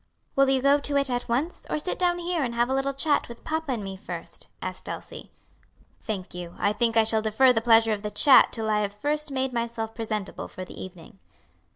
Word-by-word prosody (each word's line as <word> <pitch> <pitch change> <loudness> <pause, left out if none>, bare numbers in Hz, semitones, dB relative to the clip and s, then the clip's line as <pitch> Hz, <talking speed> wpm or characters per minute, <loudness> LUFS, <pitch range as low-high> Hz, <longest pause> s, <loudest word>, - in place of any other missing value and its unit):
"Will 275 0 +4
you 265 -1 +2
go 280 +1 +5
to 285 0 -1
it 275 -2 +1
at 245 -1 -3
once? 275 +9 -2
or - - 0
sit 305 +4 -3
down 350 -1 +2
here 350 -1 -2
and 235 -2 -3
have 240 +2 +1
a - - +2
little 270 0 -1
chat 290 -1 +1
with 235 - -11
papa 315 -3 -2
and 220 -4 -4
me 195 -1 -6
first?" 190 - -7
asked - - -6
Elsie. - - -8 0.7
"Thank 195 -4 -5
you; 175 -1 -7
I 205 - +1
think 230 +1 +1
I 225 - +6
shall 220 0 +3
defer 220 +4 +4
the 225 - 0
pleasure 225 -1 +5
of 205 - -4
the 210 - -3
chat 255 +6 +6
till 220 -2 -3
I 215 -1 +2
have 200 -1 -2
first 300 +6 -2
made 265 -1 -2
myself 230 -1 -3
presentable 215 -3 -4
for 185 - -8
the - - -10
evening." 185 +2 -12
235 Hz, 230 wpm, -26 LUFS, 215-275 Hz, 0.7 s, I